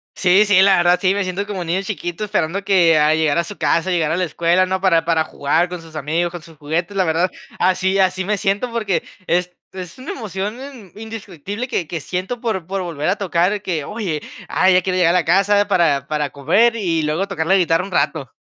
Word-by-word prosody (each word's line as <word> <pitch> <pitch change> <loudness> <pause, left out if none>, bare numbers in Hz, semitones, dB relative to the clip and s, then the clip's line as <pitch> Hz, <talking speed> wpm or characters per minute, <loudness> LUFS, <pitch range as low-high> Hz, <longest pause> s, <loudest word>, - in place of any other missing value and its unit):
Sí, 190 +3 +4
sí, 200 -2 +5
la 195 0 +6
verdad, 175 +1 +3
sí, 190 -1 +3
me 200 0 -1
siento 190 +3 -3
como 195 -3 -4
un 170 - -6
niño 180 +3 0
chiquito 190 -1 -4
esperando 195 -2 -1
que, 170 -5 +4
a 150 +1 +4
llegar 160 -1 +1
a 170 - +2
su 205 +3 -9
casa, 165 +2 +1
llegar 170 -4 +1
a - - 0
la 180 - +1
escuela 170 +3 +2
¿no? 190 0 -2
Para 170 -4 +3
para 165 -1 +2
jugar 160 +6 0
con 180 -1 -6
sus 165 -1 -15
amigos, 160 +4 -1
con 175 -1 -8
sus 165 -1 -16
juguetes, 165 +6 -3
la 185 - +2
verdad, 165 +3 +1 0.3
así 190 +1 +1
así 185 -1 +1
me 210 +1 0
siento, 205 +5 -1
porque 215 -5 -1 0.2
es 180 +1 0 0.2
es 180 0 -8
una 265 +9 -7
emoción 210 - -5
in 260 -9 -11
indiscutible 205 - -6
que 170 - -2
que 165 -2 -5
siento 185 - -4
por 190 -8 -2
por 195 +1 -3
volver 160 -4 -4
a - - +2
tocar, 190 +1 0
que 165 -7 -3
oye, 190 -9 -4 0.3
ah, 185 - +3
ya 180 0 +5
quiere 185 0 -2
llegar 170 0 +3
a 180 - +3
casa 200 +4 +3
para 155 -8 +2
para 150 -1 -1
comer 185 - +2
y 170 -7 -1
luego 155 +6 -1
tocar 160 -2 -3
la 190 - +4
guitarra 175 -1 +2
un 195 - -10
rato. 150 -7 -1
180 Hz, 230 wpm, -19 LUFS, 165-195 Hz, 0.3 s, la